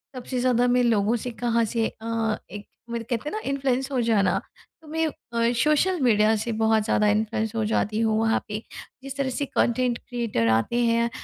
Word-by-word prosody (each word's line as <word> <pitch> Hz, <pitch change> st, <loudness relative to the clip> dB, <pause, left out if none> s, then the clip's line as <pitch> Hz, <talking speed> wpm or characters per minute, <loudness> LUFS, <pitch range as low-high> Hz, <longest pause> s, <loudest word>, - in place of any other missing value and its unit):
सबसे 250 Hz, 0 st, -4 dB
ज़्यादा 245 Hz, -1 st, +2 dB
मैं 245 Hz, 0 st, +3 dB
लोगों 225 Hz, -1 st, +2 dB
से 245 Hz, +1 st, -4 dB
कहाँ 235 Hz, 0 st, 0 dB
से 225 Hz, +1 st, 0 dB
अ, 225 Hz, -1 st, -2 dB, 0.2 s
एक 205 Hz, -1 st, -8 dB, 0.2 s
मतलब 230 Hz, -1 st, -4 dB
कहते 240 Hz, +5 st, -2 dB
हैं -, -, -9 dB
ना -, -, -2 dB
इन्फ्लुएंस 270 Hz, 0 st, -1 dB
हो 260 Hz, -, 0 dB
जाना। 210 Hz, -5 st, +2 dB, 0.4 s
तो 310 Hz, -, -17 dB
मैं 320 Hz, +1 st, -1 dB
अ, 235 Hz, -5 st, -2 dB
सोशल 315 Hz, +4 st, +2 dB
मीडिया 220 Hz, -2 st, +4 dB
से 225 Hz, +2 st, -3 dB
बहुत 220 Hz, -1 st, +3 dB
ज़्यादा 210 Hz, -1 st, +2 dB
इन्फ्लुएंस 220 Hz, +1 st, 0 dB
हो 220 Hz, -, 0 dB
जाती 215 Hz, 0 st, 0 dB
हूँ। 220 Hz, -1 st, +2 dB
वहाँ 225 Hz, 0 st, +2 dB
पे 210 Hz, 0 st, -4 dB, 0.4 s
जिस 275 Hz, 0 st, -7 dB
तरह 275 Hz, -1 st, 0 dB
से 280 Hz, +3 st, -2 dB
कंटेंट 245 Hz, -1 st, +1 dB
क्रिएटर 235 Hz, -, -2 dB
आते 235 Hz, -, -1 dB
हैं 235 Hz, 0 st, +2 dB
235 Hz, 200 wpm, -25 LUFS, 220-250 Hz, 0.4 s, मीडिया